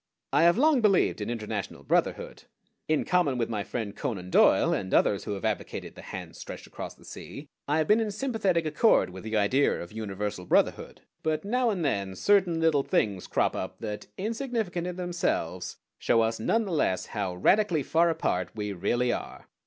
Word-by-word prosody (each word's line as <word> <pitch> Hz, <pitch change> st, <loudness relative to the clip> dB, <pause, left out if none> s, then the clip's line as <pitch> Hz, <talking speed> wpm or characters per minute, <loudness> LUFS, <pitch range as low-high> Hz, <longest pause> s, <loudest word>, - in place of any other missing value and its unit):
I -, -, +4 dB
have 170 Hz, +3 st, +5 dB
long 290 Hz, -1 st, +4 dB
believed 195 Hz, -, +3 dB
in 105 Hz, -, -3 dB
international 110 Hz, -3 st, -4 dB
brotherhood. -, -, -1 dB, 0.4 s
In 155 Hz, -1 st, +1 dB
common 175 Hz, -8 st, +2 dB
with 115 Hz, -2 st, -1 dB
my 105 Hz, -3 st, -2 dB
friend 105 Hz, -3 st, -4 dB
Conan 90 Hz, -5 st, -4 dB
Doyle -, -, +5 dB
and 95 Hz, -1 st, -3 dB
others 100 Hz, -, +2 dB
who 105 Hz, -, -3 dB
have 95 Hz, -, -6 dB
advocated -, -, -3 dB
the -, -, -11 dB
hands -, -, -8 dB
stretched -, -, -8 dB
across -, -, -8 dB
the -, -, -19 dB
sea, 145 Hz, +1 st, -9 dB, 0.2 s
I 145 Hz, +2 st, +2 dB
have 155 Hz, -1 st, +1 dB
been 215 Hz, +2 st, +5 dB
in 220 Hz, -2 st, 0 dB
sympathetic 205 Hz, -7 st, 0 dB
accord 155 Hz, -, +3 dB
with 95 Hz, +1 st, -9 dB
the 110 Hz, 0 st, -1 dB
idea 125 Hz, +8 st, +2 dB
of 85 Hz, -, -8 dB
universal 105 Hz, -3 st, -4 dB
brotherhood; -, -, +1 dB, 0.2 s
but 155 Hz, +2 st, -1 dB
now 245 Hz, +3 st, +1 dB
and 185 Hz, -7 st, -1 dB
then 100 Hz, -7 st, -1 dB
certain 185 Hz, -, +3 dB
little 160 Hz, -3 st, +3 dB
things 100 Hz, -8 st, 0 dB
crop -, -, +1 dB
up 95 Hz, 0 st, -5 dB
that, 105 Hz, -2 st, -5 dB
insignificant 220 Hz, -5 st, -2 dB
in 180 Hz, -, -4 dB
themselves, 175 Hz, -, -2 dB, 0.2 s
show 115 Hz, -, +3 dB
us 115 Hz, 0 st, 0 dB
none 225 Hz, -, +1 dB
the 195 Hz, -, -5 dB
less 95 Hz, -, +1 dB
how 100 Hz, -4 st, -2 dB
radically 175 Hz, -, +3 dB
far 170 Hz, +5 st, +3 dB
apart 95 Hz, -, -1 dB
we 105 Hz, -2 st, -3 dB
really 120 Hz, +7 st, 0 dB
are. -, -, -6 dB
140 Hz, 190 wpm, -28 LUFS, -, 0.4 s, have